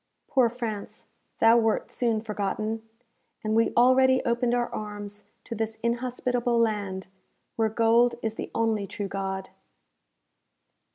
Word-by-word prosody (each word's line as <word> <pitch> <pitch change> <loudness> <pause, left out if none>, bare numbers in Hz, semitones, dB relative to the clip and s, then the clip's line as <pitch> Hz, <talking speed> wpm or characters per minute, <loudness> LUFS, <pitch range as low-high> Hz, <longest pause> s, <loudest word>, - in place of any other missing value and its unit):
Poor 255 -4 +3
France! 225 -4 -6 0.3
thou 225 +1 +6
wert 225 -1 0
soon 230 -3 0
forgotten, 215 +1 -2 0.6
and 215 0 0
we 230 0 +3
already 260 +1 +5
opened 235 +1 +1
our 240 0 +1
arms 205 -1 -6 0.2
to - - -6
this 225 0 -3
inhospitable 245 0 0
land 205 -4 0 0.5
where 225 -1 +2
gold 230 +2 +3
is 220 -1 -1
the - - -6
only 220 -3 +1
true 200 +1 -4
God. 190 -1 -4
225 Hz, 125 wpm, -27 LUFS, 210-240 Hz, 0.6 s, thou